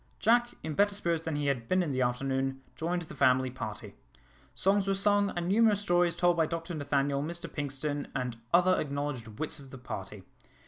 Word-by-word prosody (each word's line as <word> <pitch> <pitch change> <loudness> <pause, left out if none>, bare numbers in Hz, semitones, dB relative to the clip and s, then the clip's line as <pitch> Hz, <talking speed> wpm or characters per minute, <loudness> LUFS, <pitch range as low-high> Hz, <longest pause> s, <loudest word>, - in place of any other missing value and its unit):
Jack, 240 +2 +3
in 155 0 -3
better 205 +4 +3
spirits 170 -5 0
than 160 -2 -3
he 145 0 -1
had 130 -5 -1
been 185 0 +2
in 155 - -2
the 130 -1 0
afternoon, 135 +2 -1
joined 175 +2 -2
the 160 - -10
family 130 -1 +3
party. 130 - -6 0.6
Songs 195 +1 +2
were 195 - +2
sung, 205 0 +3
and 175 0 -1
numerous 210 +1 +4
stories 175 -4 +2
told 175 0 +3
by 165 -2 +2
Dr 165 +2 -4
Nathaniel, 140 -2 0
Mr 170 +3 -5
Pinkstone, 145 0 -3
and 125 -2 -2
other 180 +2 +4
acknowledged 140 -5 -3
wits 155 -1 -3
of 135 -1 -13
the 130 - -9
party. 125 - -7
160 Hz, 190 wpm, -30 LUFS, 135-180 Hz, 0.6 s, numerous